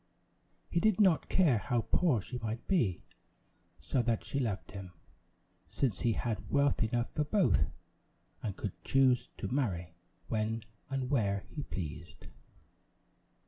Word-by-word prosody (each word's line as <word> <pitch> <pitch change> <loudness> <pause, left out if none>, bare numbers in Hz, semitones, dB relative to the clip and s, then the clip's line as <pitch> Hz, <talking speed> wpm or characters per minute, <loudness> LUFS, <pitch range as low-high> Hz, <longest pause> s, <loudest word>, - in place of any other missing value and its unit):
He 170 - +2
did 215 0 +3
not 185 -6 +4
care 155 - +4
how 120 +3 0
poor 130 - +2
she 125 +4 -5
might 115 0 -4
be, 120 - +1 0.8
so 130 - 0
that 115 -2 0
she 140 - -2
loved 110 -7 -2
him; 95 -2 -8 0.7
since 110 -9 -1
he 115 - +2
had 110 -3 -3
wealth 140 -3 +3
enough 120 +2 0
for 150 - +1
both, 150 - +3 0.7
and 100 -3 -4
could 100 - -5
choose 130 -2 +3
to - - -3
marry 95 - -1 0.3
when 110 0 -1 0.3
and 135 -1 -2
where 100 -7 +1
he 150 - -4
pleased. 90 - -6
120 Hz, 140 wpm, -32 LUFS, 100-140 Hz, 0.8 s, not